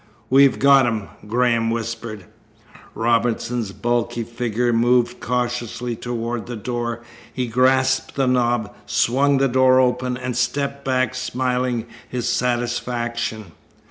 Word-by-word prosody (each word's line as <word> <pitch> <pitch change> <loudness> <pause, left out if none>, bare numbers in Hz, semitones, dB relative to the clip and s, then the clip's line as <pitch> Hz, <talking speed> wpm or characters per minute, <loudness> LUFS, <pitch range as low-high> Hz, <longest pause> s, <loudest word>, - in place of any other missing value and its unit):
"We've 135 0 +6
got 135 -2 +5
him," 110 -4 -2 0.2
Graham 115 0 +2
whispered. 115 -3 -4 0.7
Robinson's 115 -1 0
bulky 120 +3 -1
figure 120 +1 -1
moved 120 +1 +2
cautiously 120 -1 -2
toward 120 0 -4
the 120 - -5
door. 120 +1 -4 0.3
He 125 - -2
grasped 130 +2 +2
the 135 - +1
knob, 120 -4 +1
swung 140 +3 +2
the 135 0 +3
door 130 0 +4
open, 125 0 +1
and 125 -1 -4
stepped 140 +2 -1
back, 130 -2 0
smiling 125 -2 -1 0.2
his 125 -1 -3
satisfaction. 120 -3 -2
120 Hz, 115 wpm, -21 LUFS, 115-125 Hz, 0.7 s, We've